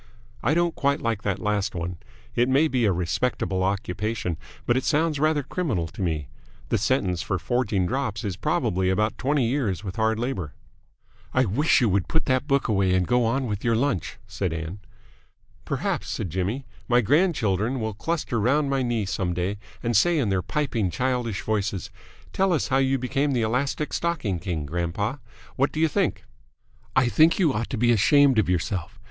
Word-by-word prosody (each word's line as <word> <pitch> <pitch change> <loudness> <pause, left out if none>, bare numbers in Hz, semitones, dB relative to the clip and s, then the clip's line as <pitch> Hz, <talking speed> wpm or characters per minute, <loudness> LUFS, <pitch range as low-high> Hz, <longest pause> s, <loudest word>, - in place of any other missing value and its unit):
I 145 +7 +2
don't 170 -1 +2
quite 140 0 +1
like 115 -3 -1
that 100 -3 -1
last 105 0 -1
one. 85 +1 -4 0.4
It 120 +2 +2
may 140 +4 +4
be 130 -5 +1
a 100 - +4
respectable 95 +2 -1
occupation, 95 0 -2 0.3
but 120 - +2
it 130 - +1
sounds 155 -1 +1
rather 155 -1 +2
criminal 130 - -2
to - - -9
me. 80 -5 -1 0.4
The - - +1
sentence 95 -7 +1
for 95 - -1
forging 105 -1 0
drops 115 -2 -2
is 100 -4 -2
probably 90 +2 0
about 105 +3 0
twenty 140 -1 +1
years 115 - -1
with 95 +1 -6
hard 110 0 +2
labour." 115 - -3 0.8
"I - - +4
wish 145 - +3
you 120 - +3
would 95 -1 +1
put 160 - 0
that 130 +2 +1
book 140 -2 +2
away 95 -4 +2
and 90 -1 +2
go 125 +3 +2
on 130 +4 0
with 105 -3 -3
your 115 -1 +2
lunch," 125 - -1
said 95 -4 -3
Ann. 80 +4 -5 0.9
"Perhaps," - - -2
said 90 - -3
Jimmy, 100 - -2 0.2
"my 125 -1 +4
grandchildren 125 - +1
will 110 -1 -2
cluster 145 +1 -2
round 140 +6 +2
my 135 -1 +1
knee 120 -4 0
some 90 -2 -2
day 95 +3 -2 0.2
and 120 -1 0
say 170 - +4
in 125 -8 +1
their 95 -1 +1
piping, 115 -1 -1
childish 125 -1 -1
voices, 105 -3 -2 0.4
'Tell 190 -1 +2
us 155 - 0
how 135 - +3
you 135 0 +2
became 135 +3 0
the 120 -3 +1
Elastic 135 +6 -1
Stocking 145 - -1
King, 85 -5 -3
grandpa!' 85 - -2 0.4
What 140 +2 +2
do 155 - -4
you 160 - +4
think?" 150 - 0 0.7
"I 130 -2 +4
think 160 +6 +4
you 165 -8 +3
ought 115 0 -2
to 130 - -3
be 120 +2 +3
ashamed 135 +3 +5
of 105 - +1
yourself. 90 0 -2
115 Hz, 190 wpm, -25 LUFS, 95-135 Hz, 0.9 s, ashamed